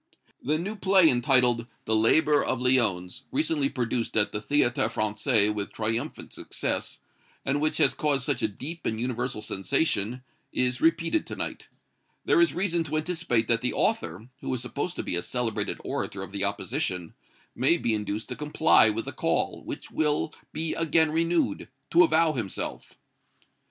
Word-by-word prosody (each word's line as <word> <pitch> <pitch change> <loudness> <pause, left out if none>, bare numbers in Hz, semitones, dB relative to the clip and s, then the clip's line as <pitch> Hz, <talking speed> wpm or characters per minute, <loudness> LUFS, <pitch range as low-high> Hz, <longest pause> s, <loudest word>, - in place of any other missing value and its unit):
"THE 150 +5 0
NEW 200 +6 -4
PLAY 190 -3 +5
entitled, 120 -2 +3 0.2
'The 110 - +2
Laborer 145 +7 +4
of 130 - -1
Lyons,' 110 -9 +1
recently 150 0 +1
produced 120 -4 -2
at 105 - +3
the 105 - -3
Théâtre 120 0 +1
Français 105 0 +1
with 105 -1 -4
triumphant 115 +6 -4
success, - - -3 0.5
and 140 +2 0
which 155 0 +1
has - - +5
caused 140 -4 0
such 135 -4 -1
a 110 - +2
deep 150 +11 -6
and 110 - -2
universal 120 -2 -2
sensation, 110 +3 0 0.3
is 125 0 0
repeated 165 - +1
to - - -5
night. - - -5 0.6
There - - +4
is 335 - +3
reason 175 -2 0
to 155 +1 -2
anticipate 155 -9 0
that 115 -1 +2
the 125 - 0
author, 90 +7 -1
who - - -4
is 120 - -4
supposed 145 +8 -4
to - - -3
be - - -2
a 85 - 0
celebrated 120 +2 -2
orator 95 -1 -4
of 95 - -9
the 100 0 0
opposition, 90 -3 -3 0.4
may 135 +8 +3
be 115 - 0
induced 105 +1 -3
to - - -4
comply 150 -5 +4
with 110 +1 -2
the - - -4
call, - - -1
which - - -7
will 150 0 0 0.2
be 160 0 -2
again 160 -1 +2
renewed, 165 - 0 0.2
to 170 - +6
avow 160 -1 +3
himself." 110 -8 -5
125 Hz, 165 wpm, -26 LUFS, 110-155 Hz, 0.6 s, to